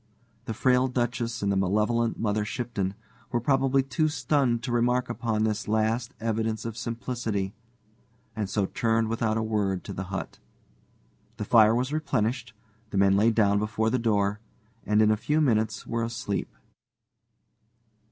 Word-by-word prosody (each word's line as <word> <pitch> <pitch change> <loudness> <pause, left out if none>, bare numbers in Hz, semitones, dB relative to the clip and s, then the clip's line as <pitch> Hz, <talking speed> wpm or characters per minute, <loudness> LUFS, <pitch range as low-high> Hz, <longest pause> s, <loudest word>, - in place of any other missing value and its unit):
The 115 - -4
frail 130 +2 +3
Duchess 120 -2 -2
and 100 - +1
the - - +1
malevolent 105 +5 +1
Mother 105 -1 0
Shipton 105 -4 -3 0.4
were 120 - +1
probably 135 +1 +2
too 135 +4 0
stunned 130 -4 +1
to 130 - -3
remark 120 +1 +1
upon 115 -2 -1
this 110 -1 -1
last 110 +4 0
evidence 110 -1 -1
of 115 -2 -4
simplicity, 115 -3 -3 0.8
and 105 -4 -2
so 100 -1 +1
turned 115 +2 0
without 110 -1 0
a 110 - 0
word 100 -4 -1
to - - -7
the 95 - -4
hut. 100 +1 -6 1.0
The 105 - -3
fire 110 0 +6
was 130 +4 -1
replenished, 125 -6 -1 0.3
the 100 - -3
men 95 0 +4
lay 105 +3 +4
down 100 -3 +3
before 110 +1 0
the 130 - +1
door, 105 -2 +1 0.5
and 105 +1 +4
in 110 - +4
a - - +4
few 150 +8 0
minutes 110 -7 +1
were 115 0 -2
asleep. 115 -3 -3
110 Hz, 155 wpm, -27 LUFS, 105-120 Hz, 1.0 s, fire